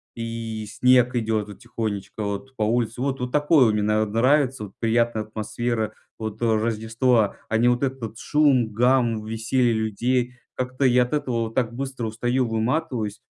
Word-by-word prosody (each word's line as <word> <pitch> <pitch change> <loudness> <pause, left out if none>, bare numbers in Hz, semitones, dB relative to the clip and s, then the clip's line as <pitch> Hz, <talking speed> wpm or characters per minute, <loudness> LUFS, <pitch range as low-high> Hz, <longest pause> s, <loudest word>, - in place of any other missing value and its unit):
и 115 -1 -5
снег 125 +1 +3
идет 110 -3 0
вот 105 - -11
тихонечко 110 -4 -4
вот 100 +6 -5
по 110 - -1
улице. 115 +1 0
Вот 135 0 -1
вот 125 0 -4
такое 145 -6 +4
мне 105 - 0
нра 105 +1 +2
нравится. 130 +3 +2
Вот 95 - -14
приятная 115 -1 +1
атмосфера 110 +1 -3 0.2
вот, 110 0 -6
э, - - +2
рождества, 115 +1 +1
а 110 - +1
не 120 +2 +3
вот 125 +2 +2
этот 135 -1 -1
вот 115 -1 -6
шум, 140 -7 +2
гам, 120 -1 +2
веселье 115 +2 +1
людей. 120 +3 0 0.2
Как-то 130 +1 -1
я 125 0 +5
от 125 - -7
этого 120 -6 -1
так 120 -2 0
быстро 130 -2 -4
устаю, 120 +3 0
выматываюсь, 115 -2 -1
115 Hz, 165 wpm, -24 LUFS, 110-125 Hz, 0.2 s, я